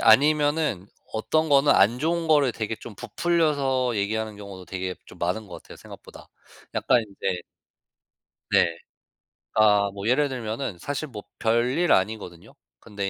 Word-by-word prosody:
아니면은 145 - +3 0.3
어떤 155 +8 0
거는 145 0 +5
안 115 +5 +4
좋은 165 +2 -1
거를 145 -5 +4
되게 110 0 -4
좀 115 - -11
부풀려서 135 - 0
얘기하는 110 +1 -2
경우도 100 -3 -10
되게 95 0 -4
좀 90 - -14
많은 90 +5 -2
거 90 - -9
같아요 - - -12
생각보다. - - -13 0.5
약간 120 - +3
인제 95 -4 -4 1.1
네. - - +5 0.9
아 105 -2 +4
뭐 100 +1 -5
예를 140 +4 +3
들면은 115 -3 -4
사실 145 - -4
뭐 105 -7 -9 0.2
별일 125 +9 +1
아니거든요? 95 -3 -1 0.3
근데 100 -3 -4
110 Hz, 295 characters per minute, -25 LUFS, 100-145 Hz, 1.1 s, 거는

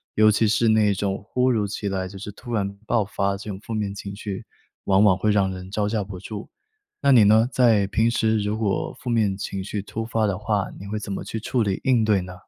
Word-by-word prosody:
尤 110 0 +6
其 105 +1 +3
是 115 +2 +2
那 110 -2 +4
种 100 0 -3
突 125 0 +3
如 110 -4 +1
其 100 +1 -4
来 95 -1 -2
就 100 - -10
是 105 - -7
突 120 +3 -8
然 100 -2 -1
爆 110 -2 +1
发 100 0 -1
这 100 - -8
种 95 - -4
负 115 - -7
面 105 -2 -2
情 100 0 -7
绪， 100 +1 -6 0.4
往 95 0 +3
往 100 -3 +5
会 105 +2 +1
让 100 -2 +2
人 95 0 -9
招 105 0 0
架 105 -1 -1
不 95 -2 -8
住。 105 +2 -7 0.5
那 140 -1 +5
你 115 -4 +7
呢， 110 +3 +5
在 115 -7 +3
平 110 +4 +2
时 110 -1 +1
如 105 +1 -1
果 105 -3 -1
负 125 - -5
面 110 -5 +1
情 95 -1 -4
绪 100 +1 -4
突 110 +3 -5
发 115 -1 0
的 100 -1 -1
话， 105 -2 0
你 100 - -9
会 105 +1 -3
怎 100 -1 -5
么 - - -4
去 110 - -5
处 115 +2 0
理 100 -2 -1
应 125 -4 +4
对 105 -2 +3
呢？ 90 0 -8
105 Hz, 270 characters per minute, -24 LUFS, 100-110 Hz, 0.5 s, 你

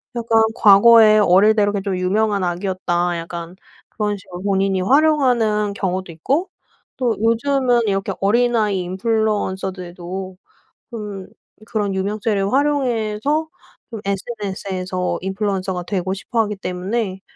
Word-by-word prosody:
약간 230 -1 +2
과거에 215 +1 +7
어릴 205 +2 +5
때 210 - +2
이렇게 205 -1 0
좀 195 -1 -2
유명한 200 +2 0
아기였다. 175 -1 -1
약간 170 +1 -7 0.3
그런 210 -1 -2
식으로 180 -1 -10
본인이 195 -1 +1
활용하는 245 -6 +2
경우도 185 -2 -3
있고 280 - -1 0.5
또 245 -4 0
요즘은 240 +2 +2
이렇게 195 -1 -1
어린아이 215 -1 +2
인플루언서들도 190 -2 -3 0.5
좀 205 -5 -7 0.4
그런 205 -3 -2
유명세를 200 +1 -1
활용해서 275 +1 0 0.4
좀 225 -3 -6
SNS에서 195 -3 -3
인플루언서가 190 -2 -2
되고 190 -1 -2
싶어 225 +4 -2
하기 210 -2 -1
때문에 190 +2 -3
200 Hz, 305 characters per minute, -20 LUFS, 185-225 Hz, 0.5 s, 과거에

